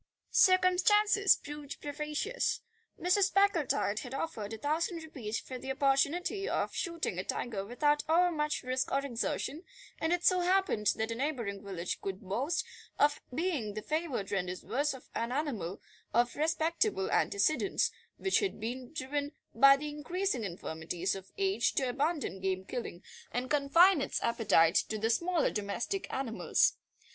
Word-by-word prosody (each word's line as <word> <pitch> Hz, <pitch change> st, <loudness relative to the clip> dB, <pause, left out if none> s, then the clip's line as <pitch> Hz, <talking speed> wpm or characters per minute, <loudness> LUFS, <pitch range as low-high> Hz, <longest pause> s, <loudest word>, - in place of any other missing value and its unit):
Circumstances 385 Hz, +2 st, +5 dB
proved 295 Hz, -1 st, -8 dB
propitious. 300 Hz, -, -2 dB, 0.4 s
Mrs. 375 Hz, +2 st, +3 dB
Packletide 335 Hz, -, +2 dB
had 250 Hz, +1 st, -6 dB
offered 225 Hz, -9 st, -4 dB
a 225 Hz, -, -5 dB
thousand 320 Hz, -, -1 dB
rupees 230 Hz, -9 st, -4 dB
for 255 Hz, -1 st, -8 dB
the 265 Hz, -, -4 dB
opportunity 285 Hz, +9 st, +1 dB
of -, -, -1 dB
shooting 335 Hz, -, -2 dB
a -, -, -2 dB
tiger 210 Hz, -3 st, -3 dB
without 295 Hz, +7 st, +1 dB
overmuch 320 Hz, -3 st, +2 dB
risk 255 Hz, +1 st, -1 dB
or 275 Hz, +1 st, +1 dB
exertion, 275 Hz, +4 st, -2 dB, 0.4 s
and 320 Hz, -, 0 dB
it 350 Hz, 0 st, 0 dB
so 370 Hz, -1 st, +5 dB
happened 360 Hz, -, +1 dB
that 220 Hz, +1 st, -2 dB
a -, -, 0 dB
neighbouring 235 Hz, -7 st, -3 dB
village 180 Hz, -3 st, -4 dB
could 195 Hz, -1 st, -4 dB
boast 235 Hz, -, -1 dB, 0.3 s
of 290 Hz, 0 st, +3 dB
being 270 Hz, -, -2 dB
the 215 Hz, -, -4 dB
favoured 305 Hz, -, -2 dB
rendezvous 185 Hz, +7 st, -2 dB, 0.2 s
of 255 Hz, -, -19 dB
an 230 Hz, +1 st, -2 dB
animal 250 Hz, -, -2 dB, 0.4 s
of 240 Hz, +1 st, +3 dB
respectable 315 Hz, -, 0 dB
antecedents, 205 Hz, +2 st, +2 dB, 0.3 s
which 385 Hz, -, +2 dB
had 400 Hz, -, -2 dB
been 245 Hz, +3 st, -5 dB
driven 290 Hz, -1 st, -3 dB, 0.2 s
by 275 Hz, +4 st, +7 dB
the 300 Hz, +2 st, -5 dB
increasing 305 Hz, -, -2 dB
infirmities 175 Hz, 0 st, -3 dB
of 195 Hz, -1 st, -8 dB
age 390 Hz, 0 st, +1 dB
to 265 Hz, -, +1 dB
abandon 280 Hz, -, -1 dB
game 190 Hz, 0 st, -2 dB
killing 200 Hz, -6 st, -6 dB, 0.3 s
and 250 Hz, +1 st, -3 dB
confine 300 Hz, +4 st, +5 dB
its -, -, -1 dB
appetite 200 Hz, -8 st, +4 dB
to 215 Hz, -, +1 dB
the 220 Hz, +2 st, +1 dB
smaller 340 Hz, +7 st, +1 dB
domestic 220 Hz, -, -3 dB
animals. 250 Hz, -4 st, +1 dB
275 Hz, 145 wpm, -31 LUFS, 220-335 Hz, 0.4 s, by